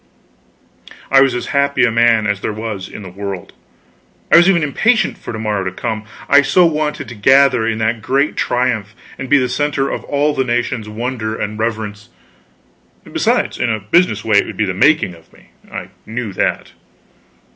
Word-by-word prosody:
I 135 0 +7
was 135 -2 +3
as 125 - -3
happy 140 -1 +2
a 120 - +1
man 115 -1 +3
as 100 -1 -1
there - - -2
was 105 -3 -5
in 105 - -9
the 95 - -8
world. 95 -1 -6 0.8
I - - +7
was 175 +2 +6
even 170 -4 +3
impatient 220 - +1
for - - -8
to 110 - -5
morrow 105 -3 -2
to 95 - -2
come, 110 +2 -4 0.2
I 145 +1 +6
so 175 +6 +4
wanted 155 -2 -1
to - - -7
gather 130 +1 +4
in 115 -1 -1
that 110 +1 -1
great 140 +6 0
triumph 115 -4 -1 0.2
and 135 - -6
be 145 - +6
the 130 -2 +1
center 145 0 -1
of - - -4
all 145 +1 +1
the 130 - 0
nation's 120 -2 -2
wonder 110 0 -4
and 105 +1 -4
reverence. 110 -1 -4 0.9
Besides, - - -1
in 120 - 0
a 110 - -1
business 110 - +1
way 105 -2 +4
it - - -1
would - - -8
be 110 - +1
the 95 - -2
making 145 - +3
of 85 -1 -19
me; - - -22 0.2
I - - -6 0.2
knew 110 -2 -4
that. - - -2
115 Hz, 190 wpm, -17 LUFS, 105-140 Hz, 0.9 s, I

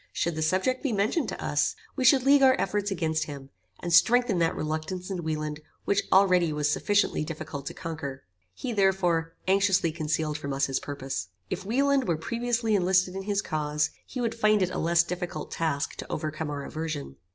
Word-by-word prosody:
Should 170 - -1
the 160 - -4
subject 185 +11 +1
be 275 - -1
mentioned 210 +11 +1
to - - -6
us, - - 0 0.2
we 265 - -1
should 260 +1 +6
league 280 +1 +5
our 260 -1 +5
efforts 205 +1 0
against 160 -4 -1
him, 140 -3 -9 0.3
and 175 - -2
strengthen 240 0 +5
that 165 -1 +2
reluctance 160 +5 -3
in 180 -2 -3
Wieland 155 -1 -3 0.3
which 200 - +2
already 180 -4 +5
was 150 -1 0
sufficiently 205 -2 +1
difficult 150 -3 -6
to - - -5
conquer. 160 -6 -6 0.3
He, 245 - -4
therefore, 180 -5 +1
anxiously 190 -3 +3
concealed 155 -1 -2
from 140 -2 -4
us 135 0 +1
his 135 -1 -1
purpose. 135 - -5 0.2
If 190 +1 -4
Wieland 275 +2 +2
were 170 -3 +1
previously 235 +4 -1
enlisted 185 -1 +2
in 195 - -3
his 200 -1 +1
cause, 150 -1 -1 0.2
he 255 - -6
would 235 -2 0
find 215 -3 +3
it 185 - -1
a - - -3
less 170 +1 +3
difficult 175 -3 -5
task 155 -3 -1
to - - -7
overcome 155 0 -3
our 145 -1 -4
aversion. 155 - -5
170 Hz, 190 wpm, -27 LUFS, 155-205 Hz, 0.3 s, should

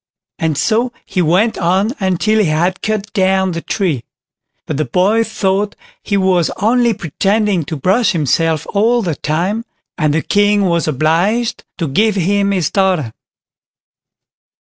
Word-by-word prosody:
And 160 -3 -1
so 235 - +1
he 185 - -1
went, 185 +8 +2
on 190 +5 +1
until 195 +3 +1
he 210 - +3
had 175 +4 0
cut 215 -1 -3
down 190 -1 +2
the 170 -1 -4
tree. 175 - -2 0.6
But 155 - -3
the 155 - 0
boy 195 - +2
thought 205 -2 -1 0.3
he 200 - -1
was 185 -3 +2
only 235 +2 +2
pretending 195 +3 0
to 160 - -5
brush 195 - +1
himself 160 0 0
all 230 +3 +2
the 170 -4 -1
time, 175 +10 -2 0.4
and 155 -2 +2
the 160 - 0
King 205 0 +2
was 170 -2 0
obliged 170 - 0
to 165 - -2
give 210 +9 +1
him 200 +2 +1
his 185 -6 0
daughter. 185 - 0
190 Hz, 150 wpm, -16 LUFS, 165-210 Hz, 0.6 s, he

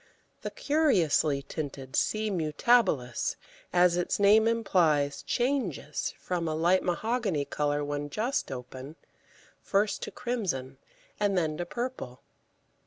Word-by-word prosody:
The - - -4
curiously 190 - +2
tinted 140 -3 -6
C. 215 0 +1
mutabilis, 160 - +1 0.4
as 175 -1 +4
its 175 - -1
name 210 +2 +6
implies, 165 -11 +2
changes 240 - -1
from 175 -2 -3
a 155 - -1
light 175 +4 +3
mahogany 195 - -1
colour 145 0 -1
when 145 0 -3
just 235 - -1
open, 130 +3 -8 0.7
first 205 +1 0
to - - -4
crimson 170 - -3 0.4
and 200 -2 +1
then 160 -3 0
to 175 - -4
purple. 235 - -5
175 Hz, 115 wpm, -29 LUFS, 145-220 Hz, 0.7 s, name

